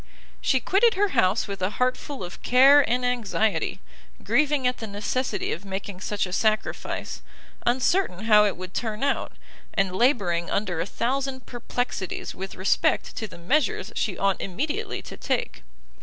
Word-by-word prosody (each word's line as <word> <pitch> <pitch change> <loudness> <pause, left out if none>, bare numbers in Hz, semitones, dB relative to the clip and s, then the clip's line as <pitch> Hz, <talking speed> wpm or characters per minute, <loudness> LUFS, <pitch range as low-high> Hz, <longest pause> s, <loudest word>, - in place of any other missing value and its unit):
She 260 - +2
quitted 400 - +3
her 410 +1 +2
house 225 - +2
with 200 -1 -6
a 185 - +1
heart 255 0 +2
full 285 -8 -7
of 175 - -8
care 270 +3 +7
and 250 +1 +1
anxiety, 220 -3 0 0.4
grieving 290 -2 +2
at 250 0 +1
the 225 - -5
necessity 210 +6 -2
of 170 - -4
making 195 -1 -6
such 205 -1 -1
a 180 - -7
sacrifice, 215 +2 -1 0.5
uncertain 245 - +1
how 210 -2 +6
it 205 - -1
would 185 0 -8
turn 220 0 -3
out, 280 - 0 0.4
and 190 -2 +1
labouring 190 -8 +2
under 185 -5 -1
a 170 - -3
thousand 260 +3 -2
perplexities 240 -5 -4
with 190 +1 -7
respect 190 +2 +1
to 220 - -3
the - - -12
measures 255 - 0
she 190 -6 -1
ought 195 -1 +1
immediately 260 - -3
to - - -9
take. - - -2
220 Hz, 160 wpm, -25 LUFS, 195-260 Hz, 0.5 s, care